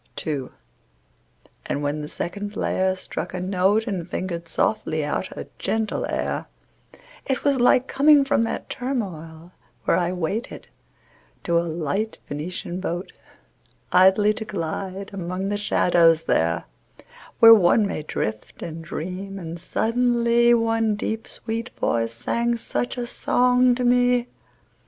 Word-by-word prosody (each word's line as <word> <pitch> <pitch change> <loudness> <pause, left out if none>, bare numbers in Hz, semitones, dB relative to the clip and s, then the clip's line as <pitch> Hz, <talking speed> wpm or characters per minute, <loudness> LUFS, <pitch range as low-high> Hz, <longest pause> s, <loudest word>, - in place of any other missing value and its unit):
II. 140 -5 -2 1.2
But - - -1
when 145 +1 -2
the 150 - -5
second 205 +6 -5
player 190 -2 0
struck 185 - -6
a - - -3
note 190 +4 +1
And 180 -5 -4
fingered 175 -2 -4
softly 160 -8 0
out 185 +5 -2
a - - -6
gentle 220 -1 -1
air - - -2 0.8
It 265 - -1
was 280 -2 +2
like 250 +1 +4
coming 290 0 +5
from 275 -3 +2
that 230 - -2
turmoil 175 - -5 0.3
where - - +3
I 175 -1 0
waited, 180 +5 -4 0.8
to 170 -1 +2
a - - +1
light 170 +6 -2
Venetian 175 +4 -5
boat, 175 -1 -4 0.8
Idly 190 +3 +5
to 220 - -5
glide 190 +1 -4
among 185 +1 -3
the 205 - -1
shadows, 170 -5 +3
there 85 - +1 0.7
Where 225 0 +10
one 210 +1 +5
may 200 - -3
drift 110 -7 -4
and 165 0 -6
dream; 185 +5 -6
and 170 -2 -7
suddenly 235 +2 +2
One 225 -2 +1
deep 220 +2 -3
sweet 230 +1 -4
voice 115 -1 0
sang 235 - -1
such 245 +2 -3
a 245 - -2
song 250 +1 +3
to 250 - -2
me. 245 0 +3
195 Hz, 135 wpm, -23 LUFS, 170-230 Hz, 1.2 s, Where